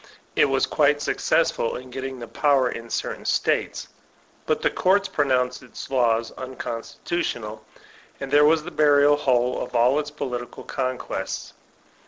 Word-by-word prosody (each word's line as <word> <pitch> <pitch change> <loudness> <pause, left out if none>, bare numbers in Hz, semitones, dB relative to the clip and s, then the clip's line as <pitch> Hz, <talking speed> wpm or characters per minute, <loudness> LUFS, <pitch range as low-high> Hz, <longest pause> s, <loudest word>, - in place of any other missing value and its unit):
It - - +5
was 135 -1 +2
quite 145 -1 +2
successful 145 -4 +1
in 125 0 -8
getting 130 +1 -5
the 120 -1 -8
power 140 -2 +2
in 115 0 -7
certain - - -3
States; - - 0 0.6
but - - 0
the - - +3
courts 195 +2 +2
pronounced 125 -3 0
its 125 +1 -10
laws 115 -3 +2
unconstitutional, 120 -2 -4 0.6
and 135 -1 -6
there 145 +1 +6
was 155 0 +4
the 175 - -7
burial 145 -2 +5
hole 125 -3 +1
of 125 - -6
all 125 +5 +4
its 145 -1 -3
political 125 -5 -5
conquests. 130 -2 -4
130 Hz, 145 wpm, -24 LUFS, 125-145 Hz, 0.6 s, there